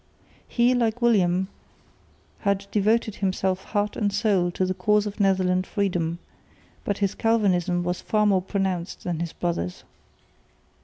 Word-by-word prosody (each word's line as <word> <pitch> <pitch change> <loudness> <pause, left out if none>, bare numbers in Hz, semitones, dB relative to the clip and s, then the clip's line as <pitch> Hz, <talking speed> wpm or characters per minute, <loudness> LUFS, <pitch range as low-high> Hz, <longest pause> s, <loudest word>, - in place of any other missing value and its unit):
He, 240 +1 +3
like 235 -2 +1
William, 190 -6 +3 0.9
had 200 -1 0
devoted 215 +1 +1
himself 190 -1 -1
heart 205 -1 -1
and 205 -2 0
soul 200 -3 +2
to 185 +1 -1
the 185 - -1
cause 210 +3 +2
of 210 +1 -6
Netherland 185 -2 +2
freedom, 175 -5 -1 0.7
but 205 - -1
his 200 -1 0
Calvinism 185 -6 +1
was 180 0 -2
far 215 -1 +1
more 195 -3 +3
pronounced 190 -2 -3
than 175 -3 -2
his 170 -1 -3
brother's. 90 - -3
195 Hz, 140 wpm, -25 LUFS, 180-210 Hz, 0.9 s, He